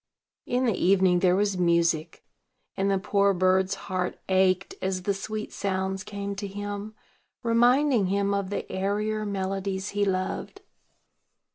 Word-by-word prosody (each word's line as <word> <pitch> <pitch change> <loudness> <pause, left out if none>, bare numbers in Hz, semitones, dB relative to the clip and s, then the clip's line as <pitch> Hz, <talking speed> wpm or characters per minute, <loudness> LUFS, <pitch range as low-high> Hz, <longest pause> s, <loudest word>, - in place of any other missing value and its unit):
In 250 +1 +1
the 230 - +2
evening 185 -1 +3
there 180 0 +3
was 200 -1 0
music; 170 -2 +1 0.5
and 195 +1 0
the 195 - +2
poor 200 0 +2
bird's 185 +1 +2
heart 185 -2 -2
ached 185 0 +2
as 185 -1 -2
the 200 - +1
sweet 215 +2 -5
sounds 190 0 -2
came 200 -1 -5
to 200 0 -4
him, 205 +1 -6 0.5
reminding 240 0 +3
him 200 +1 +1
of 200 -1 -1
the 205 - -4
airier 210 +2 -1
melodies 195 0 -2
he 205 0 0
loved. 185 -1 -2
195 Hz, 140 wpm, -26 LUFS, 185-205 Hz, 0.5 s, evening